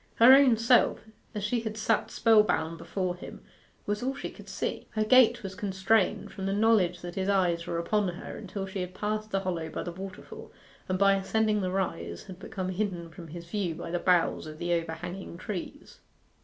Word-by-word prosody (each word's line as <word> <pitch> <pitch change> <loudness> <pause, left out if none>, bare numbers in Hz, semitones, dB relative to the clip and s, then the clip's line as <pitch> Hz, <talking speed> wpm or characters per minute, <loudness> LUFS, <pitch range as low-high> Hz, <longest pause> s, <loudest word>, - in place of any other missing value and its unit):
Her 240 +3 +9
own 265 -4 +6
self, 230 +2 +4 0.3
as 210 - -3
she 235 +4 0
had 220 -1 -5
sat 225 0 +1
spell 225 -1 +5
bound 165 -5 -1
before 185 -2 -2
him, 180 - -10 0.4
was 205 0 -2
all 265 +2 -1
she - - -6
could - - -13
see. - - -3
Her 215 - +1
gait 240 0 +5
was 190 -1 -5
constrained, 200 0 +1
from 190 0 -5
the 195 - 0
knowledge 200 -5 +3
that 175 0 -6
his 190 +1 -2
eyes 175 -3 +1
were 170 - -2
upon 205 +4 +1
her 175 0 -6
until 195 -1 -5
she 190 0 -5
had 180 0 -6
passed 215 +1 -2
the 195 -2 0
hollow 175 -4 -3
by - - -4
the 175 - -5
waterfall, 195 - -9 0.4
and 185 - +1
by 195 +1 +5
ascending 210 +2 +1
the 185 - -1
rise 85 - -3
had 185 -1 -11
become 185 -1 -5
hidden 185 -3 -3
from 165 +1 -10
his 170 +2 -8
view 180 -2 -2
by 170 0 -6
the 175 - 0
boughs 175 -3 +2
of 155 0 -9
the 175 +2 -1
overhanging 170 +2 -4
trees. 210 - -7
195 Hz, 205 wpm, -28 LUFS, 175-215 Hz, 0.4 s, Her